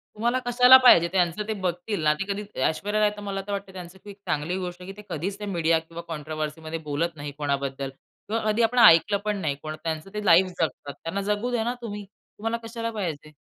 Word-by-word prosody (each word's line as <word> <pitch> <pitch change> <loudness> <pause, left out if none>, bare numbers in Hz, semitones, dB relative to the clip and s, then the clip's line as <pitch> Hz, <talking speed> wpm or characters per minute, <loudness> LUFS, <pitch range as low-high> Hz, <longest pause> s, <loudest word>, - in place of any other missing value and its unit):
तुम्हाला 240 +4 +1
कशाला 250 +2 +8
पाहिजे? 175 -10 +7
त्यांचं 185 +3 0
ते 220 - -1
बघतील 180 +1 -2
ना. 150 0 +4
ते 195 +6 -4
कधी 210 +1 -5 0.2
ऐश्वर्या 205 +6 0
राय 210 - +5
तर - - -7
मला 195 -1 -4
तर - - -4
वाटतं 195 -1 -5
त्यांचं, 180 0 -9
की 205 -1 -9
चांगली 180 -3 -3
गोष्ट 180 -1 -6
आहे, 190 +2 -8
की 195 - -15
ते 210 - -10
कधीच 195 +6 -4
ते 210 - -5
मीडिया 165 -4 +1
किंवा 165 +1 -9
कॉन्ट्रोव्हर्सीमध्ये 155 +1 -5
बोलत 165 +3 -1
नाही 145 -1 -6
कोणाबद्दल 140 -2 -2 0.4
किंवा 225 +2 -1
कधी 225 +3 +1
आपण 245 +2 +2
ऐकलं 200 0 +7
पण 210 -1 0
नाही. 155 -7 -1
कोण 155 0 -5
त्यांचं 160 +2 -4
ते 210 0 -4
लाईफ 185 +2 +6
जगतात. 145 -3 -3
त्यांना 195 +5 -3
जगू 210 +5 -1
द्या 230 -2 0
ना 240 +1 -1
तुम्ही. 205 -3 -6 0.3
तुम्हाला 225 +2 -2
कशाला 230 0 -4
पाहिजे. 155 -8 -5
190 Hz, 220 wpm, -25 LUFS, 160-210 Hz, 0.4 s, कशाला